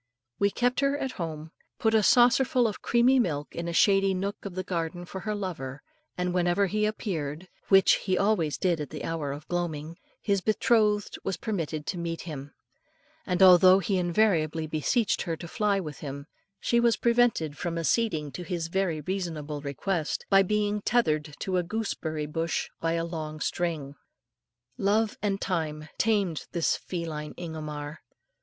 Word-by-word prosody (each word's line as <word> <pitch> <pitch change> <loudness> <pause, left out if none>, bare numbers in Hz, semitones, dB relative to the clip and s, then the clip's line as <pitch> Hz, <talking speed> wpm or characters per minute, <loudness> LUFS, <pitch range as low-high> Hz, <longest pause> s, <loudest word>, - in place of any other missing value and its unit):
We 200 - +4
kept 245 +4 0
her 280 0 +2
at 265 -3 -3
home, 160 -4 -6 0.3
put 220 0 +1
a 220 - +5
saucer 245 +5 +5
full 255 -2 +2
of 215 - -5
creamy 245 +2 +4
milk 150 -10 -1
in 170 0 -3
a - - -2
shady 195 +2 +4
nook 200 +3 -4
of 195 -3 -6
the 185 - -2
garden 175 -1 -3
for 190 - -7
her 215 +2 -3
lover, 155 -9 -5 0.3
and 180 0 -1
whenever 180 +2 +2
he 210 +2 +1
appeared, 170 -6 -4 0.2
which 195 -1 +6
he 185 -1 0
always 190 -7 +1
did 175 -4 +1
at 145 - -5
the 150 - -7
hour 160 -4 -2
of 145 +2 -8
gloaming, 165 -2 -3 0.2
his 200 -2 0
betrothed 210 -1 +2
was 190 - -2
permitted 165 -8 -3
to 180 - -3
meet 165 -1 -3
him, 145 -4 -7 0.8
and 180 +1 +3
although 185 0 +8
he 195 0 0
invariably 170 -4 +1
beseeched 155 - 0
her 165 -3 -3
to 170 - -8
fly 205 +1 +1
with 150 -6 -6
him, 140 -1 -6 0.3
she 235 - +2
was 235 -1 +3
prevented 235 -11 +2
from 170 +1 -3
acceding 165 -4 0
to 135 - -7
his 175 -2 -3
very 175 -4 0
reasonable 155 -4 -4
request, 155 +4 -2
by 195 0 +7
being 210 +1 0
tethered 155 -11 +1
to 185 -1 -1
a 180 - +1
gooseberry 170 -6 -3
bush 165 +2 -2
by 165 0 0
a 165 0 0
long 155 -2 -5
string. 160 -4 -2 0.9
Love 210 +2 +2
and 200 -2 0
time 155 -5 -2
tamed 200 -8 +1
this 170 -2 +2
feline 160 -4 -5
Ingomar. 155 -2 -6
175 Hz, 170 wpm, -27 LUFS, 155-205 Hz, 0.9 s, although